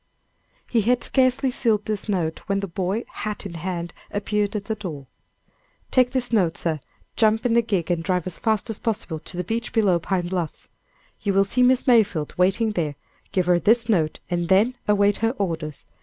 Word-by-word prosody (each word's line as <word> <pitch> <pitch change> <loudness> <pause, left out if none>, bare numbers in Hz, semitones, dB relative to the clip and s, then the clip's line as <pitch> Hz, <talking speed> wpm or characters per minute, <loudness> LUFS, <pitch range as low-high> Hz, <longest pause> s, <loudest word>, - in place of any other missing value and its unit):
He 230 - +3
had 245 +4 +2
scarcely 260 0 +2
sealed 225 -5 +1
this 215 0 -3
note, 165 -5 -1
when 200 0 +1
the 200 - -3
boy, 190 +5 -2
hat 210 -1 -5
in 195 - -6
hand, 175 0 -4 0.2
appeared 205 +1 -1
at 200 -1 -3
the 220 - -1
door. 170 -10 -6 0.9
"Take 255 -1 +4
this 250 -2 -2
note, 175 -6 +2
sir, 160 -3 -1 0.4
jump 220 +1 +2
in 240 - +3
the 235 - +5
gig 195 -7 -1
and 170 -1 0
drive 180 -1 0
as 185 -3 -4
fast 220 0 0
as 215 - -6
possible 210 -8 -2
to 175 +3 -10
the 180 - -1
beach 230 +6 -3
below 200 -6 +3
Pine 175 +1 -1
Bluffs. 175 -3 -4 0.5
You 200 -2 0
will 195 0 +5
see 240 +6 +1
Miss 255 0 +4
Mayfield 210 - +3
waiting 195 +5 +2
there, 155 -7 -2 0.4
give 185 -2 +1
her 175 -1 +4
this 230 +4 +3
note, 165 -9 +1
and 175 -1 -1
then 215 +7 +4
await 205 0 +3
her 225 +3 0
orders. 165 -6 -3
200 Hz, 195 wpm, -23 LUFS, 175-225 Hz, 0.9 s, the